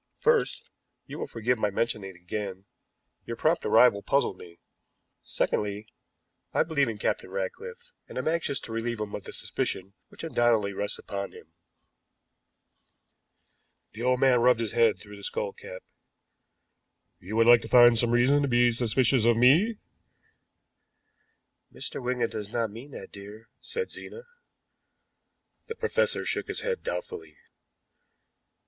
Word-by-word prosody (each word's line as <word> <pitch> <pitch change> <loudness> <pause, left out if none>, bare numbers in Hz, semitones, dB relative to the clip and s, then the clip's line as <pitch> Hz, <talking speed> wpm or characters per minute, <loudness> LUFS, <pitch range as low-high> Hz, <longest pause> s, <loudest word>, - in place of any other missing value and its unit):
First 470 +1 +1 0.4
you - - -8
will - - -3
forgive 120 +1 -1
my 105 - +1
mentioning 105 -1 -2
it 95 - -13
again 95 +2 -6 0.6
your - - -5
prompt - - +1
arrival 115 -5 +5
puzzled 135 -1 +1
me; 85 -2 -14 0.6
secondly, 105 +1 -2 0.7
I - - +4
believe 140 -5 +1
in 110 - -5
Captain - - -2
Ratcliffe, 475 0 -6 0.2
and - - -9
am - - -2
anxious 160 -4 0
to - - -9
relieve 115 0 -3
him 105 -1 -4
of 100 - -6
the - - -7
suspicion 95 +1 -2
which - - -12
undoubtedly 120 -9 +2
rests 100 +1 -2
upon 100 -1 -6
him." 80 - -15 2.4
The 110 - -9
old 125 +1 +2
man 130 -3 +4
rubbed 125 -1 +4
his 115 -2 -2
head 115 -2 +3
through 105 -1 -12
his 100 - -3
skull 100 - -3
cap. 95 - -10 1.4
"You 100 +5 -7
would 115 0 +4
like 120 0 +7
to - - -8
find 120 -1 +7
some 115 +1 +1
reason 125 +5 +4
to 140 - +1
be 120 -1 +4
suspicious 120 +1 +2
of 120 -1 +4
me?" 165 - +4 1.9
"Mr. - - -6
Wigan 125 -1 0
does 105 -1 -5
not 115 -1 -1
mean 120 +7 -10
that, - - -9
dear," 105 +3 -11
said 465 -1 -4
Zena. 470 - -10 1.4
The 455 - -5
professor 485 +1 0
shook - - -1
his - - -2
head 470 0 -2
doubtfully. 475 -4 -6
120 Hz, 145 wpm, -27 LUFS, 105-140 Hz, 2.4 s, like